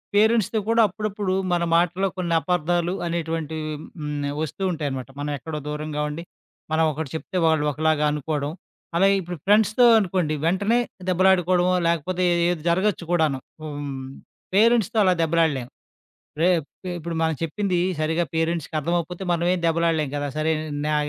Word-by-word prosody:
పేరెంట్స్‌తో 220 Hz, 0 st, +3 dB
కూడా 230 Hz, 0 st, +4 dB
అప్పుడప్పుడు 205 Hz, -1 st, -3 dB, 0.2 s
మన 175 Hz, -1 st, +1 dB
మాటల్లో 175 Hz, +3 st, +2 dB
కొన్ని 175 Hz, -2 st, -1 dB
అపార్థాలు 175 Hz, 0 st, 0 dB
అనేటువంటివి 160 Hz, -2 st, -3 dB, 0.3 s
హ్మ్. 150 Hz, -1 st, -3 dB, 0.2 s
వస్తూ 160 Hz, +5 st, -4 dB
ఉంటాయనమాట 140 Hz, -6 st, -4 dB
మనం 145 Hz, +1 st, -2 dB
ఎక్కడో 155 Hz, +2 st, -6 dB
దూరంగా 150 Hz, 0 st, -3 dB
ఉండి 155 Hz, +3 st, -6 dB, 0.5 s
మనం 160 Hz, +1 st, +3 dB
ఒకటి 150 Hz, -1 st, -5 dB
చెప్తే 170 Hz, +3 st, -4 dB
వాళ్ళు 160 Hz, -2 st, +2 dB
ఒకలాగా 155 Hz, 0 st, +1 dB
అనుకోవడం. 150 Hz, -1 st, -2 dB, 0.5 s
అలాగే 195 Hz, +2 st, +4 dB
ఇప్పుడు 175 Hz, 0 st, -6 dB
ఫ్రెండ్స్‌తో 215 Hz, +4 st, +4 dB
అనుకోండి 180 Hz, -6 st, 0 dB
వెంటనే 200 Hz, +7 st, +2 dB, 0.3 s
దెబ్బలాడుకోవడమో, 185 Hz, -1 st, +3 dB
లేకపోతే 170 Hz, +2 st, 0 dB, 0.3 s
ఏది 175 Hz, -3 st, -2 dB
జరగొచ్చు 185 Hz, +2 st, +1 dB
కూడాను 155 Hz, -6 st, +2 dB, 0.2 s
హ్మ్. 145 Hz, -3 st, -5 dB, 0.5 s
పేరెంట్స్‌తో 225 Hz, 0 st, +3 dB
అలా 185 Hz, -, +5 dB
దెబ్బలాడలేము. 155 Hz, -6 st, +1 dB, 0.7 s
రే 170 Hz, -, +4 dB, 0.5 s
ఇప్పుడు 170 Hz, 0 st, -5 dB
మనం 160 Hz, 0 st, +1 dB
చెప్పింది 180 Hz, +3 st, -1 dB, 0.2 s
సరిగ్గా 160 Hz, +2 st, +1 dB
పేరెంట్స్‌కి 165 Hz, -1 st, -1 dB
అర్థమకపోతే 170 Hz, +3 st, -2 dB
మనమేం 175 Hz, +2 st, +1 dB
దెబ్బలాడలేం 165 Hz, -3 st, +1 dB
కదా! 145 Hz, 0 st, -2 dB
సరే 155 Hz, +1 st, +1 dB, 0.3 s
నా 155 Hz, -, +1 dB
170 Hz, 135 wpm, -23 LUFS, 155-185 Hz, 0.7 s, అలా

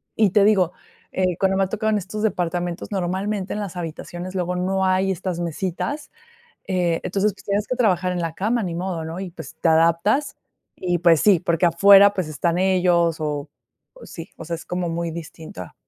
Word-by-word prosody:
Y 215 Hz, -2 st, +4 dB
te 205 Hz, +1 st, +4 dB
digo, 190 Hz, -5 st, +3 dB, 0.4 s
eh, 185 Hz, -2 st, 0 dB
cuando 190 Hz, 0 st, +2 dB
me 195 Hz, -, +3 dB
ha -, -, 0 dB
tocado 220 Hz, +2 st, -1 dB
en 215 Hz, -, +2 dB
estos 200 Hz, +3 st, -6 dB
departamentos, 175 Hz, -3 st, -2 dB
normalmente, 190 Hz, +1 st, -2 dB
en 210 Hz, -, -3 dB
las 190 Hz, -3 st, -6 dB
habitaciones 175 Hz, +2 st, -6 dB
luego 180 Hz, -1 st, -1 dB
no 190 Hz, +1 st, 0 dB
hay 190 Hz, +1 st, +2 dB
estas 185 Hz, -1 st, -3 dB
mesitas, 185 Hz, -, -3 dB, 0.6 s
eh, 180 Hz, -3 st, 0 dB
entonces, 200 Hz, +1 st, 0 dB
pues -, -, -17 dB
tienes 205 Hz, +1 st, -1 dB
que 255 Hz, -, -1 dB
trabajar 185 Hz, -6 st, +2 dB
en 180 Hz, -, -2 dB
la 165 Hz, -1 st, -3 dB
cama, 225 Hz, +4 st, 0 dB
ni 175 Hz, -3 st, -3 dB
modo, 175 Hz, -2 st, -3 dB
¿no?, 165 Hz, +3 st, -6 dB
y, 185 Hz, -2 st, -6 dB
pues, 160 Hz, -1 st, -10 dB
te 165 Hz, -, +3 dB
adaptas 170 Hz, -, +2 dB, 0.4 s
y, 175 Hz, -1 st, -1 dB
pues, 170 Hz, -3 st, +4 dB
sí, 200 Hz, -5 st, +5 dB
porque 170 Hz, 0 st, +1 dB
afuera, 200 Hz, +4 st, +7 dB
pues, 185 Hz, -5 st, -2 dB
están 165 Hz, +3 st, -1 dB
ellos 180 Hz, -3 st, +2 dB
o 150 Hz, -1 st, -3 dB, 0.5 s
o -, -, -13 dB
sí, 165 Hz, +1 st, -9 dB
o -, -, -8 dB
sea, 170 Hz, +1 st, -3 dB
es 165 Hz, -, -11 dB
como 180 Hz, -1 st, -2 dB
muy 165 Hz, 0 st, -3 dB
distinta. 160 Hz, -, -9 dB
180 Hz, 200 wpm, -22 LUFS, 170-195 Hz, 0.6 s, afuera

